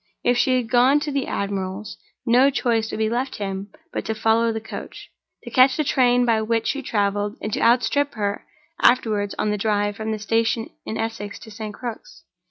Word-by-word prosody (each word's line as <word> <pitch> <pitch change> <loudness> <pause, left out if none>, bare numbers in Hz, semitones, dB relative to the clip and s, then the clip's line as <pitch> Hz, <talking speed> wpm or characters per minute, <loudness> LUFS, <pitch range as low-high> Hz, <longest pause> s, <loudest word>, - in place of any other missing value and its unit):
If 245 - +3
she 255 +1 +3
had 235 -3 -3
gone 255 +4 +5
to 300 -1 -3
the 275 -1 -1
admiral's, 195 +1 -3 0.3
no 250 +4 +5
choice 235 -4 0
would - - -4
be 220 0 +1
left 245 +4 -2
him 195 0 -4 0.2
but - - -2
to 220 - -2
follow 225 +1 +2
the 220 - -3
coach, 220 - -9 0.3
to - - -9
catch 255 0 +5
the 305 - +2
train 245 -3 +3
by 225 -2 +2
which 225 +1 0
she 280 - -1
traveled, 205 -3 -1
and 215 - -4
to - - 0
outstrip 250 +4 +2
her 205 -2 -2 0.4
afterward 215 -5 +3
on 210 - 0
the 210 - -2
drive 205 -1 0
from 220 0 -3
the 215 - -1
station 225 +2 0 0.2
in 220 - -3
Essex 215 -2 -4
to 220 - -11
St. 215 -1 -7
Crux. 250 - -8
225 Hz, 200 wpm, -23 LUFS, 210-245 Hz, 0.4 s, gone